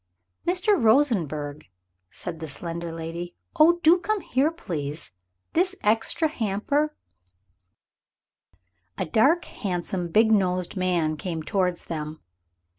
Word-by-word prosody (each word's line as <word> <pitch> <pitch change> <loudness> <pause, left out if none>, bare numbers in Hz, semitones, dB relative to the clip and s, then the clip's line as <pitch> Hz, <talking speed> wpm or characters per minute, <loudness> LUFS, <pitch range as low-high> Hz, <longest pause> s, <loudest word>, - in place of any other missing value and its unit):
"Mr. 370 +2 +2
Rosenberg," 170 - +2 0.4
said 165 - -6
the 160 - -5
slender 170 +3 -4
lady 165 +2 -6 0.2
"oh, 335 +3 +6
do 340 +3 +6
come 425 +2 -1
here, 270 +1 +1
please! 155 - -4 0.4
This 370 +3 +2
extra 225 +9 +2
hamper 285 +4 -1 1.1
" 90 0 -44
A - - -1
dark, 275 - +3
handsome, 180 -2 -3
big 220 +6 +4
nosed 185 -3 +1
man 175 -4 0
came 165 -1 -4
towards 180 0 0
them. 155 -1 -5
185 Hz, 115 wpm, -25 LUFS, -, 1.1 s, oh